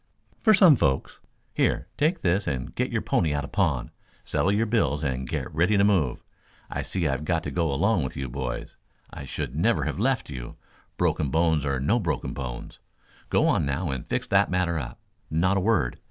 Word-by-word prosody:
"For 220 -3 +6
some 185 -6 +7
folks. 65 - 0 0.3
Here, - - +1
take 160 +4 +1
this 95 +3 +1
and 65 -4 -3
get - - -1
your - - -1
pony 75 -3 +1
out 70 - -1
of 70 - -8
pawn, - - 0 0.3
settle 95 - +1
your 105 +3 +2
bills 75 - +1
and 65 -2 -2
get - - -3
ready 90 +7 +3
to 100 - +4
move. 90 -11 +2 0.5
I - - -2
see 90 -4 -1
I've 70 +1 -1
got 80 +1 0
to 70 - -4
go 80 +1 0
along 95 +5 +2
with 65 - -5
you 65 - -3
boys. 65 0 -5 0.3
I 70 - -8
should 70 -1 -5
never 110 +9 +2
have - - -3
left 130 +3 +1
you, 65 -4 -7 0.4
broken 75 -3 +1
bones 80 -2 +2
or 70 -1 0
no 75 - +2
broken 75 - -2
bones. 65 -4 -7 0.5
Go - - +3
on - - +2
now 70 +3 -1
and 65 -2 -4
fix - - -1
that - - +4
matter 90 -3 0
up. - - -7 0.3
Not 90 +5 +2
a - - +1
word. 95 - +1
80 Hz, 200 wpm, -26 LUFS, 70-100 Hz, 0.5 s, some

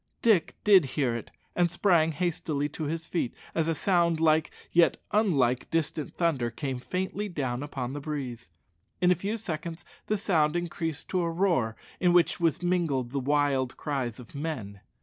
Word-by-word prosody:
Dick 210 -8 +3
did 195 -6 +7
hear 130 -5 +2
it, 115 - -6 0.3
and 175 -1 +3
sprang 170 -3 +3
hastily 155 -3 -1
to 155 +1 -5
his 160 +2 -3
feet, 165 -9 -2 0.2
as 165 -1 +1
a 165 - +1
sound 170 -2 +2
like, 160 -1 +3 0.2
yet 170 0 +4
unlike, 140 - +2
distant 160 -2 -2
thunder 150 -9 +1
came 130 +1 -4
faintly 190 +8 -3
down 130 -7 -2
upon 135 -3 -4
the 145 - -4
breeze. 135 -6 -5 0.5
In 180 0 +4
a - - +8
few 200 +6 -3
seconds 165 -5 -5 0.2
the 215 - +1
sound 165 -7 +2
increased 165 -2 -3
to 185 - +1
a 170 - 0
roar 165 - +1 0.2
in 180 -1 +3
which 175 0 +4
was 165 0 +1
mingled 160 -9 0
the 140 - -1
wild 135 -2 +1
cries 130 -6 -3
of 120 - -12
men. 130 - -5
160 Hz, 170 wpm, -28 LUFS, 135-175 Hz, 0.5 s, a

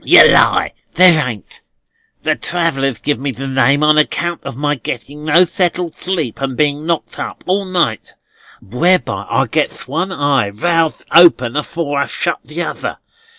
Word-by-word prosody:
"Yer - - +8
lie, - - +3 0.2
there 165 -6 +5
ain't. 105 -5 -10 0.6
The - - +1
travellers 135 -8 -1
give 145 +6 -2
me 140 +1 -3
the 135 +1 -6
name 135 +2 +2
on 155 0 +5
account 170 +2 -1
of - - -7
my 145 +1 0
getting 140 +3 -7
no 165 +4 +5
settled 175 -1 -2
sleep 165 - -4
and 135 -2 -3
being 150 +1 0
knocked 170 -2 -3
up - - -6
all 195 +2 0
night; 175 - -1 0.5
whereby 120 - 0
I - - +1
gets - - -2
one 165 +8 -2
eye 145 - 0
roused 165 +8 -1
open 150 -8 +5
afore 150 -1 -2
I've 140 - -2
shut 170 -4 -2
the 165 +3 -5
other. - - -5
150 Hz, 160 wpm, -16 LUFS, 135-170 Hz, 0.6 s, Yer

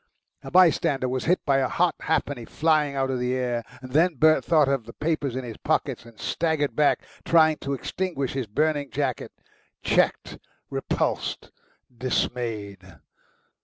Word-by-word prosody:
A - - -8
bystander 155 -7 +4
was 130 0 -2
hit 180 +3 +1
by 140 -2 +3
a 130 - +1
hot 175 +5 +1
halfpenny 145 -5 -1
flying 150 -1 +1
out 135 -1 0
of 130 - -2
the 125 +1 0
air. 120 -2 -1 0.2
Then 155 +7 +2
Bert 155 +3 +4
thought 155 -4 +3
of 135 -5 -1
the 115 - -9
papers 150 -5 -2
in 130 - -3
his 115 -3 -7
pockets, - - -1
and 115 -2 -16
staggered 160 -3 -1
back, 150 -1 +2 0.2
trying 160 -2 +4
to 140 - -4
extinguish 140 -2 -3
his 130 -4 -3
burning 145 +5 0
jacket 135 -4 -2 0.5
checked, - - +1 0.3
repulsed, - - -2 0.4
dismayed. 115 -5 -2
140 Hz, 150 wpm, -25 LUFS, 125-155 Hz, 0.5 s, bystander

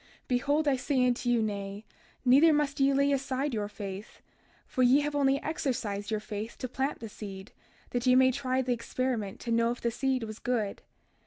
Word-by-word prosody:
32:36 - - -39
Behold 285 +5 +1
I 280 - +4
say 255 -1 +1
unto 245 0 0
you, 240 -2 +3
Nay; 200 0 -4 0.4
neither 280 +6 +7
must 295 -2 0
ye 275 0 +4
lay 280 +1 +3
aside 275 0 -1
your 210 -2 -1
faith, 200 0 -8 0.4
for 255 - -2
ye 255 +3 +6
have 295 0 -2
only 275 -1 +3
exercised 225 -10 -2
your 215 -1 0
faith 215 +1 -6
to 255 - -4
plant 265 +2 -2
the 225 - -5
seed 200 -1 -9 0.4
that 245 +1 -1
ye 250 - +6
might 260 0 +5
try 260 -1 0
the 250 -1 +1
experiment 230 -3 -3
to 235 - -4
know 230 0 +3
if 245 - -3
the 235 - -1
seed 260 0 0
was 215 0 -7
good. 225 -5 -2
250 Hz, 200 wpm, -29 LUFS, 220-270 Hz, 0.4 s, neither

